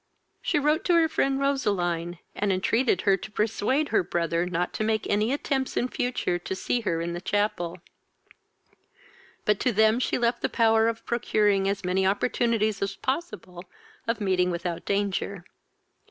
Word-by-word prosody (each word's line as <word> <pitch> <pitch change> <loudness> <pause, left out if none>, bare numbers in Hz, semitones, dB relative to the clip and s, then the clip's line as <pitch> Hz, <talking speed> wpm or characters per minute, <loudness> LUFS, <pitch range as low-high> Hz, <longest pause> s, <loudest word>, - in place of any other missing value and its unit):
She - - 0
wrote 300 +3 +2
to 350 - +4
her 330 -1 +5
friend 275 -3 0
Roseline, 175 -11 0 0.2
and 205 -1 0
entreated 190 +2 +1
her 195 -2 +4
to 205 - -8
persuade 225 +7 0
her - - +3
brother 170 0 -1
not 180 0 -2
to - - -2
make 220 0 0
any 210 +3 +1
attempts 270 -1 -1
in 245 - +1
future 245 -9 -1
to 190 - -4
see 235 +5 -1
her 170 -6 -1
in 170 0 -3
the 175 - -5
chapel; 185 -4 -1 1.7
but 210 -2 +2
to 255 - +1
them 220 +2 +4
she - - 0
left 240 0 0
the - - 0
power 225 -1 +3
of 230 0 -3
procuring 210 -4 +1
as 200 -1 -3
many 185 +1 +1
opportunities 215 0 +1
as 195 0 -2
possible 260 - -4 0.4
of 230 0 0
meeting 185 -3 +1
without 175 -1 -3
danger. 200 -2 -1
205 Hz, 165 wpm, -26 LUFS, 185-240 Hz, 1.7 s, her